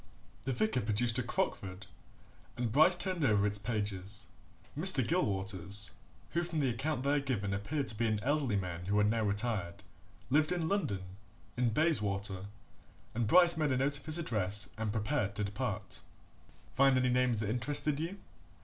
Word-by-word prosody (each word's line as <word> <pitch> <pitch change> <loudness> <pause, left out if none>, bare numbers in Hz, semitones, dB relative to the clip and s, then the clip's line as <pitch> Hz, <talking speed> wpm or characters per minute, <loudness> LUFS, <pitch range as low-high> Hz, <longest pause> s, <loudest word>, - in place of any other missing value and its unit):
The 135 - -3
vicar 175 - 0
produced 115 +3 +1
a - - +2
"Crockford", 100 -5 -3 0.7
and 120 -2 -2
Bryce 155 +8 +6
turned 180 -2 +1
over 105 -6 +3
its 105 0 -1
pages. 100 -2 -2 0.5
Mr. 155 -6 +4
Gilwaters, 100 - +2 0.4
who 170 - 0
from 170 -2 -2
the 135 -3 +1
account 135 +3 -2
there 145 +1 +2
given 110 -8 -2
appeared 130 +9 -3
to 110 - -5
be 115 +2 0
an 110 -1 0
elderly 140 -4 0
man 90 -3 -4
who 100 +2 0
had 105 0 +3
now 115 0 0
retired, 100 -4 -2 0.5
lived 155 +3 +3
in 175 -3 -1
London, 150 - -1 0.5
in 120 -1 +1
Bayswater, 100 - 0 0.7
and 115 -1 -1
Bryce 175 +5 +6
made 155 -3 +1
a 130 - +1
note 140 +2 0
of 145 - -18
his 155 +1 +2
address 105 - 0
and 110 -1 -3
prepared 105 -1 -1
to 105 - -1
depart. 105 0 -4 0.7
"Find 135 0 +4
any 130 0 +2
names 125 -1 +2
that 105 -1 -2
interested 145 +4 0
you?" 170 +5 -4
115 Hz, 165 wpm, -32 LUFS, 100-145 Hz, 0.7 s, Bryce